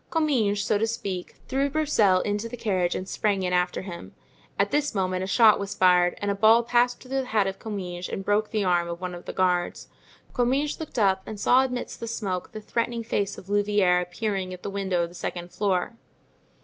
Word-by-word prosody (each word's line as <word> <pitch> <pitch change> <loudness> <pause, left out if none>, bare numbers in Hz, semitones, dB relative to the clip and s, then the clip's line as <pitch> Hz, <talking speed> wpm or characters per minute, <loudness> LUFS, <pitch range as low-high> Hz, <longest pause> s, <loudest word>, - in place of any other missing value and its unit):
Comminges, 240 -11 +1
so 210 -1 +1
to 225 - +1
speak, 195 -5 -4
threw 275 +1 0
Broussel 245 -11 +3
into 210 +2 -2
the 245 - -7
carriage 185 -6 0
and 185 - -4
sprang 200 -2 0
in 180 0 -1
after 180 0 0
him. 175 -3 -9 0.4
At - - +1
this 290 -4 0
moment 185 -1 0
a - - -3
shot 220 +1 +5
was 200 0 -4
fired 180 -1 +4
and 205 0 -1
a - - +1
ball 220 +3 +5
passed 245 +1 +2
through 255 - -14
the - - -6
hat 215 -5 +1
of 195 0 -4
Comminges 180 -5 -5
and 195 - -5
broke 210 +1 +1
the 215 -3 0
arm 175 -2 +2
of 170 0 -5
one 185 -1 -4
of 175 0 -9
the - - -4
guards. 180 -2 0 0.4
Comminges 265 +4 0
looked 315 -5 -7
up 190 -3 +3
and 215 - -6
saw 255 +5 +5
amidst 250 -2 -4
the 230 - -5
smoke 195 -6 -3
the 215 - -7
threatening 230 +2 -2
face 205 -3 -2
of 185 - -12
Louvieres 205 -3 +2
appearing 185 0 -3
at 180 - -17
the 200 - -4
window 190 -3 0
of 170 - -4
the - - -15
second 175 0 -5
floor. 185 +2 0
200 Hz, 215 wpm, -26 LUFS, 185-230 Hz, 0.4 s, shot